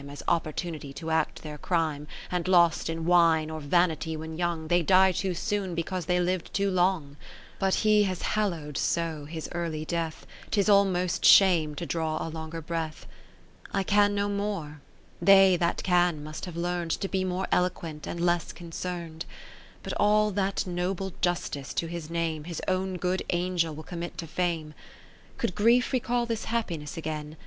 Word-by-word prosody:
As 145 - -8
opportunity 155 -3 -2
to 160 +2 -5
act 160 - 0
their 150 -1 -7
crime, 155 -4 -1 0.2
60 - - -6
And 180 0 -1
lost 170 -3 +4
in 165 0 -3
wine 165 -3 +4
or 160 - -4
vanity 160 +1 +1
when 160 +1 -6
young, 170 -2 -2
They 175 +2 +3
die 190 +3 +5
too 185 0 -2
soon, 200 -2 -2
because 170 0 -3
they 180 0 +2
liv'd 180 -1 -1
too 200 -1 +1
long: 175 -6 +1 0.4
But 195 -1 +2
he 215 -1 +4
has 185 -2 -3
hallowed 170 -9 -1
so 160 -3 -1
his 160 +1 -6
early 165 -3 -3
death, 165 -1 -3 0.2
'Tis 200 -2 +1
almost 190 -3 +3
shame 170 -6 +6
to 170 - -4
draw 160 -2 -1
a - - -3
longer 160 +1 -6
breath. 160 -1 -4 0.7
I 195 - +1
can 205 +1 +3
no 200 0 +1
more, 200 -8 -3 0.4
they 195 -1 +7
that 170 0 0
can 175 -4 +2
must 155 +4 -6
have 175 -2 -8
learn'd 175 0 -2
To 195 - -2
be 190 -1 -1
more 185 +1 -2
eloquent, 165 -4 -1
and 170 - -4
less 175 -1 +1
concern'd. 170 -1 -6 0.6
But - - -4
all 210 0 +3
that 195 0 -1
noble 185 +1 -2
justice 175 -6 -2
to - - 0
his 165 -1 -6
name. 165 -2 -2
His 170 -2 -5
own 185 0 0
good 180 +1 -1
Angel 175 -3 0
will 155 - -8
commit 175 +1 -6
to 170 - -4
Fame. 165 -2 -2 0.6
Could - - -1
grief 235 +7 +3
recall 245 -1 +1
this 230 -2 -3
happiness 170 -11 -3
again. 155 -1 -5
175 Hz, 175 wpm, -28 LUFS, 160-190 Hz, 0.7 s, they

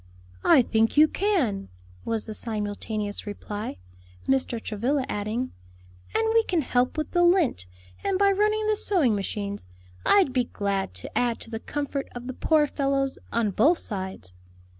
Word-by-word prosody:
"I 255 - +6
think 225 +3 +1
you 305 +1 +8
can," 300 - 0 0.4
was 225 -2 -1
the 220 - -5
simultaneous 210 -1 -3
reply; 205 - -5 0.5
Mr. 260 -3 +1
Travilla 250 +6 -1
adding, 220 +4 -2 0.6
"and 445 - +2
we 455 0 +5
can 345 -7 0
help 250 +3 +1
with 310 - -2
the 350 -1 +3
lint, 345 - +3 0.4
and 390 -1 +1
by 400 0 +4
running 425 +2 +2
the 430 0 +2
sewing 350 - +2
machines. 200 - -4 0.4
I'd 380 -10 +4
be 250 -2 +2
glad 200 - -2
to 90 - -9
add 240 -2 +1
to 225 - -12
the 225 - -3
comfort 285 +1 -3
of 245 0 -6
the 260 - -4
poor 310 +3 +3
fellows 275 -2 -1
on 230 -3 +1
both 290 - +4
sides." 190 - -5
245 Hz, 160 wpm, -26 LUFS, 210-310 Hz, 0.6 s, you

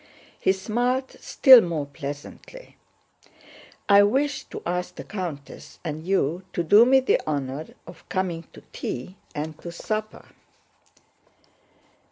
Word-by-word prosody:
(He - - +3
smiled 245 +7 -1
still 260 -4 +8
more 165 -6 -2
pleasantly.) 145 - -9 1.1
"I 200 0 +7
wished 270 +8 0
to - - -8
ask 180 +1 -3
the - - -7
countess 170 -9 -7
and 155 +1 -5
you 185 -2 0
to 175 - -1
do 210 +8 +6
me 265 +1 +5
the 260 - +2
honor 140 0 -3 0.2
of 170 -1 -14
coming 175 -3 -2
to - - -14
tea 180 +11 -6 0.2
and 155 +1 -4
to 170 - -7
supper." 215 +5 -5
180 Hz, 125 wpm, -24 LUFS, 155-215 Hz, 1.1 s, still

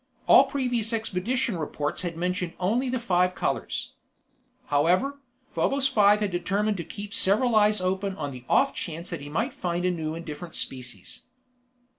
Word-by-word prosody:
All - - +8
previous 245 -5 -1
expedition 225 +1 -1
reports 150 -1 -3
had 170 -2 -4
mentioned 180 0 -2
only 230 +8 +1
the 255 - 0
five 180 -5 +1
colors. - - -2 0.7
However, 180 - +2 0.3
Probos 275 0 +2
Five 210 -3 +4
had 205 -2 0
determined 200 +4 0
to 170 - -3
keep 200 +3 -8
several 220 +5 +3
eyes 210 -1 +4
open 190 +1 -1
on 145 -7 -4
the 125 -2 -9
off 275 - +4
chance 170 0 -5
that - - -4
he 145 - -8
might 225 - -1
find 175 -9 -2
a 180 - +3
new 160 -2 -3
and 165 0 -7
different 155 +2 -7
species. 125 -2 -4
190 Hz, 165 wpm, -26 LUFS, 170-225 Hz, 0.7 s, All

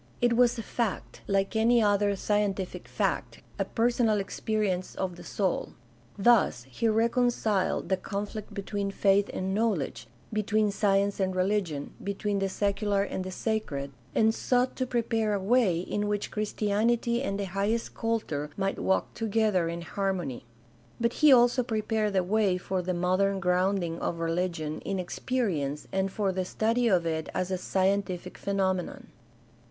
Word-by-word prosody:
It 240 -1 +3
was 240 0 +4
a 230 - -4
fact, 230 -1 -3
like 195 +1 0
any 235 +2 +4
other 205 -1 +3
scien 205 0 +1
tific 190 -2 -6
fact, - - -2 0.2
a - - +1
personal 230 -2 +2
experience 195 -2 -2
of 185 -2 -3
the 175 - -11
soul; 190 +1 -1 0.4
thus 200 - +4
he 225 - 0
reconciled 225 -2 +1
the 190 - +2
conflict 205 +2 -5
between 200 0 -3
faith 195 0 +2
and 190 +1 -2
knowledge, 200 - -1 0.3
between 215 0 +1
science 200 0 +1
and 190 -1 0
religion, 185 -6 -1
between 200 0 -1
the 195 0 0
secular 200 0 0
and 190 -2 -3
the 185 - -5
sacred, 185 -9 -2 0.2
and 220 0 +4
''sought 250 +2 +1
to 255 - -2
prepare 225 -3 0
a - - -1
way 195 -4 +3
in 205 +3 -2
which 205 0 -2
Christianity 220 +3 0
and 200 -7 -2
the 200 - -1
highest 210 +4 -1
culture 215 -11 -2
might 195 0 -1
walk 190 - 0
together 215 -6 +1
in 170 0 -5
harmony." 180 -9 -3 0.5
But 235 0 +1
he 305 -2 +8
also 245 0 +6
prepared 220 -2 -1
the 190 -1 +2
way 195 -1 +2
for 185 0 -2
the 180 0 -2
modern 185 +3 +1
grounding 180 -1 +1
of 170 - -2
religion 165 -2 -2
in 195 - -3
experience 175 - -2
and 190 0 0
for 200 -1 0
the 185 0 -1
study 230 +5 +1
of 180 -6 +3
it 160 -1 -2
as 185 +1 -1
a 185 - 0
scientific 190 -1 -1
phenomenon. 195 +7 -1
200 Hz, 155 wpm, -28 LUFS, 185-220 Hz, 0.5 s, he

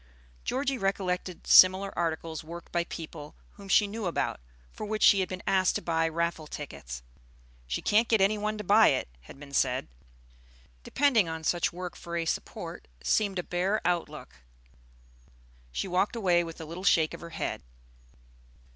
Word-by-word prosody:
Georgie 270 0 -1
recollected 185 -2 -2
similar 190 +1 +7
articles 165 -1 -2
worked 170 +2 -10
by 175 0 +1
people 155 -3 -8 0.2
whom 200 -1 -13
she 205 - +5
knew 205 0 -4
about, 170 - -1 0.3
for - - -8
which 215 0 -2
she 200 - +7
had 185 - -1
been 185 0 -6
asked 185 -1 +2
to - - -1
buy 165 -1 +1
raffle 170 -1 -2
tickets. - - -8 0.6
"She - - -3
can't 220 +3 +3
get 220 - +3
any 195 +2 +4
one 215 +1 -2
to 210 - -5
buy 210 +3 +6
it," 130 - +1 0.2
had 135 - -13
been 140 -1 -12
said. - - +1 0.9
Depending 235 - +2
on 160 0 -5
such 175 +2 +1
work 180 0 -6
for 170 0 -5
a 165 - -1
support - - -5 0.2
seemed 200 -3 +1
a 180 - -1
bare 185 +5 0
outlook. 175 -1 -2 1.3
She 195 - -3
walked 190 +5 +1
away 180 -6 +3
with 165 -1 -8
a 160 - -6
little 170 +4 -8
shake 160 -5 +3
of - - -8
her 170 - -8
head. 165 - -4
180 Hz, 170 wpm, -28 LUFS, 165-200 Hz, 1.3 s, similar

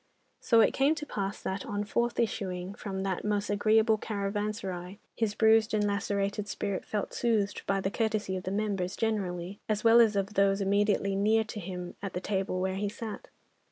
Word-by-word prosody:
So 230 -3 +4
it - - +4
came 280 +4 +3
to 300 - -5
pass 200 -7 -3
that, 190 0 -3
on 205 -2 -2
forth 235 +3 -1
issuing 190 -5 -2
from 190 -2 -5
that 190 -2 -2
most 210 0 0
agreeable 215 +1 +3
caravanserai, 200 -3 -3 0.2
his 215 -2 -1
bruised 220 0 +4
and 210 -1 +2
lacerated 200 0 -1
spirit 200 -2 -3
felt 210 -2 -3
soothed 215 -4 0
by 195 0 +1
the 195 - -1
courtesy 215 -3 -1
of 185 - -3
the - - -1
members 200 -3 -1
generally, 195 -4 -2
as 215 -1 0
well 230 +1 +7
as 220 -3 +4
of 200 +1 -1
those 195 -1 +3
immediately 200 0 +2
near 215 +3 +3
to 215 0 -7
him 180 -1 -6
at 195 -1 -5
the 180 - -2
table 190 -1 -1
where 190 +1 -1
he 205 +1 -1
sat. 225 0 -7
205 Hz, 190 wpm, -29 LUFS, 195-215 Hz, 0.2 s, well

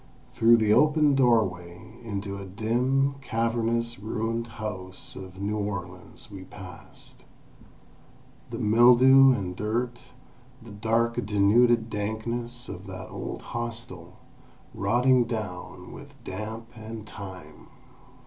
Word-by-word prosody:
Through 115 +1 +6
the 110 -2 +3
open 150 +1 +4
doorway, 110 -6 0
into 100 -2 -4
a 100 - -7
dim, 125 +7 0
cavernous, 115 -1 -1
ruined 115 +2 -2
house 105 -4 -7
of 95 0 -10
New 105 +2 -2
Orleans 100 +3 -6
we 95 -2 -8
passed. 90 -1 -11 1.3
The 115 - -5
mildew 125 +4 +7
and 95 -7 -2
dirt, 120 +4 -3 0.5
the 115 -3 -13
dark 115 +3 0
denuded 115 +3 +3
dankness 115 +4 -3
of 95 +3 -8
that 95 -1 -8
old - - -6
hostel, 115 -7 -5 0.6
rotting 120 +5 +3
down 90 -5 -6
with 140 0 -12
damp 110 +4 -6
and 110 -1 -8
time! 95 -3 -10
110 Hz, 110 wpm, -27 LUFS, 100-120 Hz, 1.3 s, mildew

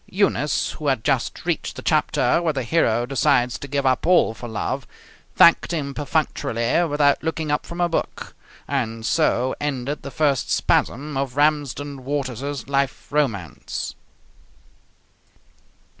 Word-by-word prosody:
Eunice, 180 -7 +1
who 150 - -6
had 130 -5 +1
just - - -1
reached - - -2
the - - -8
chapter - - +2
where 165 -3 0
the 135 -2 -2
hero 120 -4 +2
decides 125 -3 +1
to 140 - -7
give 140 0 -1
up 130 +4 +1
all 175 -10 +4
for 120 +2 -8
love, 110 - -3 0.5
thanked 170 - +6
him 145 -5 -2
perfunctorily 140 -2 0
without 145 -1 +3
looking 160 -1 -2
up 150 - -1
from 170 - -7
her 175 0 +2
book; 165 - -3 0.3
and 115 -5 -2
so 125 +2 +2
ended 145 0 -2
the - - -7
first 145 -3 0
spasm 145 +3 +1
of 135 -2 -2
Ramsden 145 -2 0
Waters's 140 -1 -3
life 140 -1 -1
romance. 115 - -2
140 Hz, 140 wpm, -22 LUFS, 125-150 Hz, 0.5 s, thanked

